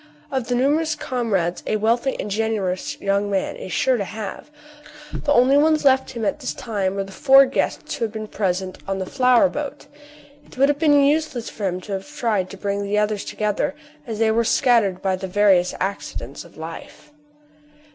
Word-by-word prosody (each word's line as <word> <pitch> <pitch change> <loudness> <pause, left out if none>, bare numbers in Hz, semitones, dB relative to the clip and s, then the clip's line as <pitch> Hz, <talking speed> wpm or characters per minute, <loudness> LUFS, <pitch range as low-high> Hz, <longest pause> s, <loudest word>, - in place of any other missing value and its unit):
Of 260 -4 -2
the 245 - 0
numerous 300 +5 +1
comrades 220 - -1
a - - +1
wealthy 235 +5 0
and 210 - -4
generous 205 -4 -2
young 200 +1 0
man 195 -1 -1
is 185 - -8
sure 250 +10 +2
to 205 - -1
have, 215 +6 -7 0.6
the 290 - -2
only 265 +1 +5
ones 305 0 +3
left 265 -1 +4
him 235 -4 -4
at 200 - -1
this - - -4
time 200 -5 -2
were 195 - -1
the 195 - -11
four 270 +6 +6
guests 265 - -2
who 230 - -1
were 215 0 -6
present 190 -3 -2
on 195 0 -1
the 190 - -3
flower 255 +4 +4
boat. 290 0 -6 0.6
It 285 - -18
would 275 +2 +4
have 290 0 0
been 290 -3 +5
useless 290 -4 0
for 205 -3 -3
him 180 0 -3
to 205 - -10
have 195 +4 -4
tried 225 -10 -1
to 195 - -9
bring 200 0 -2
the 200 +1 -1
others 210 -1 0
together, 210 +6 -2 0.3
as 225 -2 -4
they 220 0 +2
were 230 +1 +2
scattered 230 -6 +2
by 190 -1 +1
the 190 - -5
various 190 -2 +3
accidents 195 +2 -4
of - - -18
life. 300 - -9
220 Hz, 195 wpm, -22 LUFS, 195-265 Hz, 0.6 s, four